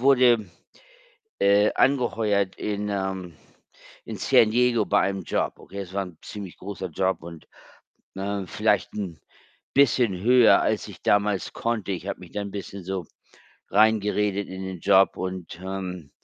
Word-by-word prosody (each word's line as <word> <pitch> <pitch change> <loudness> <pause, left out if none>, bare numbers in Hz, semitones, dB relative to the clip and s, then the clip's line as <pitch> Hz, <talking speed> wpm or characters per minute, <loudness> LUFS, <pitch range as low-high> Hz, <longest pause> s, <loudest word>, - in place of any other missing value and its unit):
wurde, 125 -6 +4 0.9
äh, 100 +1 +4
angeheuert 110 -7 +1
in, 105 0 -3
ähm 95 -3 -3 0.7
in - - -6
San 110 - +4
Diego 120 -2 +3
bei 100 - +3
einem 95 -1 -1
Job, - - -1
okay? 100 - -11
Es 95 -1 -8
war 100 0 0
'n 90 -4 -13
ziemlich 100 -4 -8
großer 95 -1 -6
Job 95 +2 -1
und 85 -2 -11 0.7
ne, 100 +1 -3
vielleicht - - 0
'n 90 -8 -5 0.5
bisschen 125 -8 +3
höher, 125 +1 +6
als - - 0
ich - - -12
damals 100 -1 +1
konnte. 110 -4 -2
Ich 90 +1 -5
habe - - -4
mich 90 - -13
da 105 - -3
'n 100 - -6
bisschen 100 -1 -7
so 95 -3 -4 0.6
reingeredet 105 -1 +2
in 95 0 -7
den 95 -2 -6
Job 95 +3 +4
und, 90 -2 -5
ähm 95 -5 -5
100 Hz, 150 wpm, -25 LUFS, 95-105 Hz, 0.9 s, höher